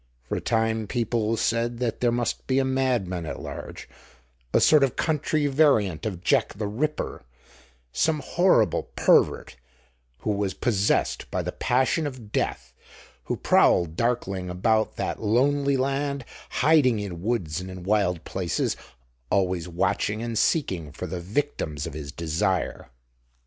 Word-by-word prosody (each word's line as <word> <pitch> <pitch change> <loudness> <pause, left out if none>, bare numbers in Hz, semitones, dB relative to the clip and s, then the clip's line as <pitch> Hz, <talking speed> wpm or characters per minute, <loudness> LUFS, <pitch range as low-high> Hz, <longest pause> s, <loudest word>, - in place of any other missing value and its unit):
For - - -2
a - - -4
time 110 -1 0
people 115 -1 0
said 115 +1 0
that 120 -2 -2
there 120 -1 +3
must 120 -1 -2
be 130 - +1
a 135 - +3
madman 120 -11 0
at - - -5
large, - - -8 0.6
a - - +4
sort 150 -3 +6
of 135 - +1
country 155 -1 0
variant 130 - +2
of 90 -4 -6
Jack - - +2
the 105 +1 -3
Ripper, 150 +9 -3 0.7
some 160 -1 +1
horrible 180 +7 +2
pervert - - +3 0.6
who 110 - -1
was 100 -2 -1
possessed 105 -5 0
by - - -2
the - - -3
passion 130 +5 +1
of 125 -7 -9
death, 65 - -2 0.5
who - - -2
prowled 85 -2 +3
darkling 100 -5 -1
about 110 +5 +1
that - - -3
lonely 140 +5 +2
land, 140 0 -1 0.2
hiding 145 -8 +3
in 90 -5 -5
woods 90 -7 -1
and 95 - -7
in 95 -1 -8
wild 95 -4 +1
places, 90 -3 -1 0.5
always 90 -3 +1
watching 100 +5 -1
and 115 -1 -3
seeking 95 - 0
for - - -6
the 90 +2 -4
victims 90 - -2
of 80 - -6
his 70 -1 -6
desire. 85 -2 -1
110 Hz, 145 wpm, -25 LUFS, 90-130 Hz, 0.7 s, sort